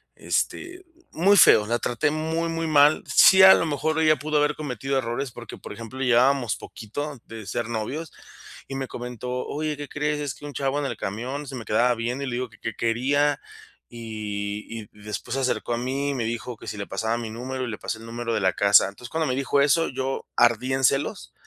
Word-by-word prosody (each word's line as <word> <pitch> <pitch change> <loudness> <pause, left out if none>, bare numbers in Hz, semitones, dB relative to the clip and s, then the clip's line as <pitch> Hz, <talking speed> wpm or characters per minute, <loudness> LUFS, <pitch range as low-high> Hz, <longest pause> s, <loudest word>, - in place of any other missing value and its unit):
Este, 365 0 -3 0.3
muy 200 +5 +4
feo. 105 - +7
La 120 +1 0
traté 120 +4 0
muy, 160 +2 -1
muy 165 0 -2
mal. 150 0 +5
Sí, 190 0 +7
a 190 - +11
lo - - +1
mejor 160 +1 -1
ella 155 -1 +4
pudo 150 +2 -1
haber 150 0 +2
cometido 135 -2 -3
errores, 125 +1 -2
porque, 120 -2 -10
por - - -9
ejemplo, 115 +3 -9
llevábamos 125 -1 +3
poquito 140 +5 -7
de 110 -2 -9
ser 115 +3 -2
novios, 130 +8 -4 0.6
y 135 - -6
me 135 -1 -3
comentó: 125 +1 -5
"Oye, 150 0 -3
¿qué 145 -1 -6
crees?, 150 0 -1
es 145 -3 -3
que 145 - -12
un 145 - -7
chavo 135 +2 -1
en 145 - -2
el 120 -5 -3
camión 130 +8 -4
se 135 - -7
me 115 -4 -7
quedaba 120 +4 +3
viendo, 120 +4 -3
y - - -5
le 120 - -3
digo 125 -1 -3
que, 105 - -20
¿qué 115 - -4
quería?, 140 +6 +1 0.5
y 110 -1 -5
y - - -16 0.2
después 105 +4 -5
se 135 - -1
acercó 125 -2 -1
a - - 0
mí, 135 +3 -2
y - - 0
me 120 - -1
dijo 115 +1 -4
que - - -13
si 105 - -5
le 100 - -5
pasaba 110 +1 -1
mi 115 -2 -5
número 130 +3 -5
y - - -4
le 105 - -5
pasé 110 - -5
el 115 - -11
número 115 0 -4
de - - +1
la 95 0 +2
casa". 100 -1 +5
Entonces, 120 +5 -11
cuando 160 -1 -1
me 130 - 0
dijo 140 +1 +1
eso, 165 +3 +3
yo 135 0 -3
ardí 120 +2 +3
en 135 0 -1
celos, 135 +2 0
130 Hz, 225 wpm, -24 LUFS, 115-145 Hz, 0.6 s, a